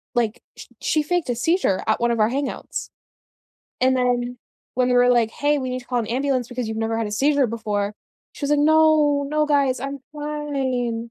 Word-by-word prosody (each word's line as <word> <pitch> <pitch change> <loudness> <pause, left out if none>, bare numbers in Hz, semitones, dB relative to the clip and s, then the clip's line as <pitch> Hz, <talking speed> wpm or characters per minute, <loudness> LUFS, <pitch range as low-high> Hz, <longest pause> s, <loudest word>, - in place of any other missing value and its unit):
like, 235 0 0 0.2
sh - - -9 0.2
she 310 - +1
faked 350 -2 -1
a 245 - +1
seizure 250 - +1
at 220 - +2
one 235 0 +2
of 230 - -1
our 215 0 +4
hangouts, 275 +2 -4 0.9
and 260 +1 +3
then 245 -1 0 0.4
when 250 0 +2
we 250 - +2
were 245 0 +5
like, 235 -2 +3
"Hey, 290 +5 +1
we 255 -2 -3
need 255 - -3
to 245 - -17
call 245 -1 -1
an 225 - -4
ambulance 255 0 0
because 245 -2 -4
you've 220 - -4
never 225 0 -1
had 225 - -1
a 210 - -5
seizure 280 +4 +3
before." 210 -3 -2 0.4
She - - -7
was 285 - -1
like, 295 -1 +3
"No, 305 -2 +4
no, 305 +1 +1
guys, 280 -3 +2
I'm 275 +1 -4
fine, 270 -6 -3
255 Hz, 210 wpm, -22 LUFS, 235-290 Hz, 0.9 s, were